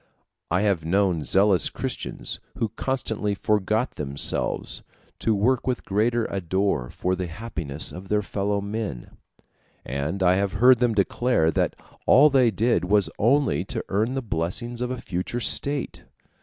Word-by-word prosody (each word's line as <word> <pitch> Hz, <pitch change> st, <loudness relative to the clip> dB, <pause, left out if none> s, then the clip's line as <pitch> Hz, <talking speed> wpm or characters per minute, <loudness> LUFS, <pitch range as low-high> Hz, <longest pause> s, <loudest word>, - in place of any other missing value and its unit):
I 90 Hz, +3 st, +1 dB
have 100 Hz, -6 st, +1 dB
known 90 Hz, -1 st, +1 dB
zealous 95 Hz, +6 st, +3 dB
Christians -, -, -4 dB, 0.2 s
who 115 Hz, -, 0 dB
constantly 110 Hz, -3 st, -2 dB
forgot 105 Hz, +4 st, 0 dB
themselves, 70 Hz, -1 st, -1 dB, 0.4 s
to 110 Hz, -, +1 dB
work 120 Hz, +6 st, +1 dB
with 125 Hz, -2 st, -1 dB
greater 110 Hz, +3 st, +1 dB
ardor 95 Hz, -7 st, -1 dB
for 90 Hz, +1 st, -1 dB
the 90 Hz, -1 st, -3 dB
happiness 85 Hz, -6 st, -4 dB
of 95 Hz, +2 st, -9 dB
their 105 Hz, +1 st, +1 dB
fellow 100 Hz, +1 st, -1 dB
men; 100 Hz, -, -5 dB, 0.7 s
and 70 Hz, +9 st, -2 dB
I 90 Hz, +1 st, +4 dB
have 100 Hz, -1 st, 0 dB
heard 125 Hz, +4 st, +6 dB
them 120 Hz, -3 st, +2 dB
declare 100 Hz, -4 st, +2 dB
that -, -, 0 dB, 0.3 s
all 145 Hz, +3 st, +7 dB
they 130 Hz, -3 st, +5 dB
did 110 Hz, 0 st, +1 dB
was 100 Hz, +1 st, +2 dB
only 135 Hz, +6 st, +2 dB
to 125 Hz, -4 st, -4 dB
earn 110 Hz, +6 st, 0 dB
the 135 Hz, -, -2 dB
blessings 115 Hz, +6 st, -3 dB
of 125 Hz, -, -1 dB
a 130 Hz, -, -3 dB
future 95 Hz, +4 st, -4 dB
state. 140 Hz, +4 st, 0 dB
100 Hz, 150 wpm, -24 LUFS, 90-120 Hz, 0.7 s, all